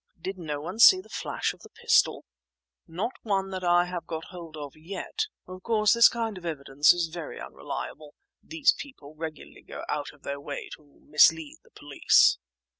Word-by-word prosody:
"Did 190 +3 -6
no 150 -4 -4
one 180 +8 -7
see 370 +10 +9
the 375 - -13
flash - - -3
of - - -20
the - - -15
pistol?" - - +2 0.6
"No 180 +9 -3
one 195 -3 -1
that 185 -1 -5
I 175 0 +4
have 180 -2 -6
got 160 -1 -5
hold 170 -4 -10
of 145 -2 -8
yet. 195 - -5 0.2
Of 185 0 -10
course 215 -1 +2
this 235 0 +7
kind 225 -4 -4
of - - -19
evidence 145 -3 +2
is 175 -2 0
very 170 -3 -7
unreliable; 150 -1 -7 0.3
these 320 -3 +2
people 155 - -11
regularly 155 -1 -8
go - - -9
out 145 -1 -3
of 145 - -23
their 140 0 -4
way 145 0 -6
to - - -24 0.2
mislead 155 0 +4
the - - -24
police." 145 -1 +3
170 Hz, 185 wpm, -27 LUFS, 150-195 Hz, 0.6 s, see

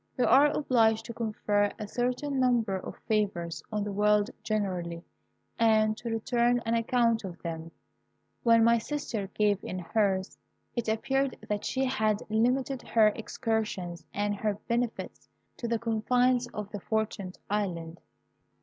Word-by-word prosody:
We 250 - +3
are 280 +3 +7
obliged 225 -7 +2
to 235 - -6
confer 210 -2 0
a 215 - -5
certain 250 +5 -1
number 240 -6 +2
of 190 - -6
favours 195 -6 0
on 210 -1 -1
the 205 - -3
world 210 +1 +3
generally, 180 -6 -2 0.6
and 215 -1 +4
to 235 - -5
return 240 +2 +2
an 225 - 0
account 230 -1 +2
of 180 -3 -7
them. 165 -1 -5 0.7
When 230 -1 +5
my 235 0 +5
sister 225 -6 -3
gave 205 -2 +2
in 185 - -4
hers, 190 +1 0 0.4
it 235 -2 -1
appeared 270 +5 0
that 205 -1 -2
she 265 0 0
had 220 -5 +1
limited 250 +4 +1
her 220 -2 +4
excursions 215 -6 -3
and 205 0 -1
her 210 0 0
benefits 235 -1 -2 0.3
to 235 - -4
the 230 0 +1
confines 245 +2 +2
of 210 -3 -7
the 205 - -5
Fortunate 205 -3 -2
Island. 175 -5 -2
220 Hz, 145 wpm, -29 LUFS, 205-240 Hz, 0.7 s, are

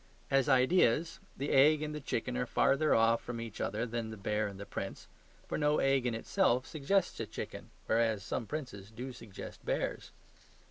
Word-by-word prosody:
As 135 0 +3
IDEAS, 150 +3 +3 0.2
the 140 +2 -2
egg 150 +3 +5
and 150 0 -3
the 150 - -4
chicken 125 -1 -2
are 125 0 -1
further 140 +5 +3
off 115 +1 +4
from 120 -1 -5
each 115 -2 -6
other 110 +4 -1
than 115 -1 -3
the 110 - -7
bear 105 +2 -1
and 100 -1 -8
the 100 - -6
prince; - - -6 0.4
for - - -2
no 150 0 +3
egg 135 -2 +2
in 120 - -1
itself 125 - +1
suggests 165 +5 0
a - - -3
chicken, - - -7 0.2
whereas 110 -3 +1
some 115 +3 -3
princes 125 -10 -6
do 125 +3 -7
suggest 115 -4 -10
bears. - - -2
125 Hz, 185 wpm, -32 LUFS, 115-145 Hz, 0.4 s, egg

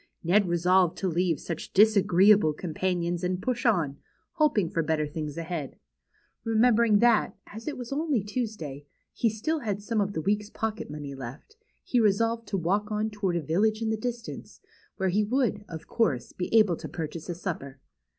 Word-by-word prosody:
Ned 190 +4 +3
resolved 180 +1 +3
to 190 - -1
leave 175 -2 +1
such 165 -2 -6
disagreeable 200 -4 +5
companions, 175 +1 -2
and 180 0 -1
push 245 +4 -1
on, 160 -10 +1 0.3
hoping 280 - +2
for 165 - -1
better 155 -1 0
things 150 0 -5
ahead. 165 -4 -4 0.7
Re 225 -1 -2
membering 230 -2 +4
that, 235 -2 +3
as 220 +2 -10
it 300 - -2
v'as 245 +1 -6
only 290 -7 0
Tuesday, 205 - -5 0.3
he 230 - +1
still 265 +10 -2
had 210 -6 -2
some 215 +1 -1
of 200 0 -1
this 160 - -3
Aveek's 205 +2 0
j^ocket 220 0 -4
money 145 -2 -6
left, 135 - -9 0.3
he 245 - +1
resolved 225 +2 +2
to 195 - -1
BEHIND - - -3
THE - - -2
WARDROBE. 200 +2 +3
6i - - -18
walk 210 - -13
on 215 +1 0
toward 200 -4 -1
a 170 - 0
village 215 +9 +1
in 220 - 0
the - - +1
distance^ 235 +1 -6 0.4
where 190 -1 +1
he 205 +4 +2
would; 225 -2 0
of 160 -1 -7
course; 180 - 0
be 180 - -4
able 215 -7 +4
to - - -7
purchase 165 0 -6
a 175 - -2
supper. 155 -7 -5
200 Hz, 195 wpm, -27 LUFS, 165-220 Hz, 0.7 s, disagreeable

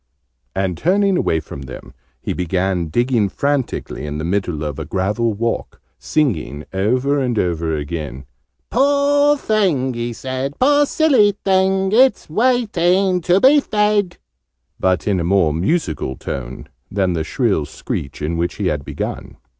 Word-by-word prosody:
And, 95 -3 -1
turning 195 +3 +2
away 80 - +1
from 75 -2 -9
them, - - -10 0.3
he - - -3
began 90 0 -1
digging 120 +2 +1
frantically 140 - -2
in 75 0 -4
the 75 - -4
middle 90 -3 -1
of 75 0 -4
a 80 - -4
gravel 105 +7 -1
walk, 115 +2 -3 0.2
singing, 80 - -1
over 125 +9 +1
and 125 -4 -1
over 85 -4 0
again, 75 -3 -5 0.5
"'Poor 285 +2 +3
thing,' 180 - +1
he 120 0 -3
said, 130 +3 -4
'poor 290 +2 +4
silly 255 -12 +3
thing! 190 0 +2
It's 255 -6 +3
waiting 195 -5 +2
to 175 +2 +3
be 275 +6 +6
fed!'" 210 -6 0 0.6
but 95 -1 +1
in 100 -3 +1
a - - -1
more 85 -3 +2
musical 85 - -1
tone 65 -1 -6 0.2
than 95 -3 0
the 80 -2 -1
shrill 100 - 0
screech 75 - -6
in 80 +2 -1
which 85 +1 -1
he 105 - -3
had 75 -2 -2
begun. - - -6
120 Hz, 145 wpm, -19 LUFS, -, 0.6 s, be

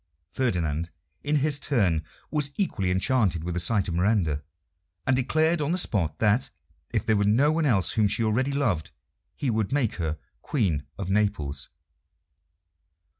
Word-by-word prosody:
Ferdinand, 85 - -1 0.3
in 150 +1 0
his 145 0 +1
turn, 95 - +1 0.3
was 150 -2 0
equally 100 - 0
enchanted 95 - +1
with 90 +1 -3
the 90 - -1
sight 95 +3 +1
of 85 - -2
Miranda, 90 -5 +1 0.6
and 130 - +3
declared 155 +5 +2
on 145 +2 0
the - - +1
spot 85 - 0
that, 110 +4 +2 0.4
if - - -1
there 110 - +3
were 100 - +2
no 120 +9 +4
one 160 -1 +1
else 100 -8 +2
whom 110 -2 +2
she 115 - 0
already 125 +6 +1
loved, 115 - 0 0.5
he 135 - -1
would 110 0 -1
make 135 -6 0
her 80 -3 -2 0.2
Queen 90 - -1
of 95 -1 -3
Naples. 75 -9 -1
105 Hz, 160 wpm, -26 LUFS, 85-135 Hz, 0.6 s, no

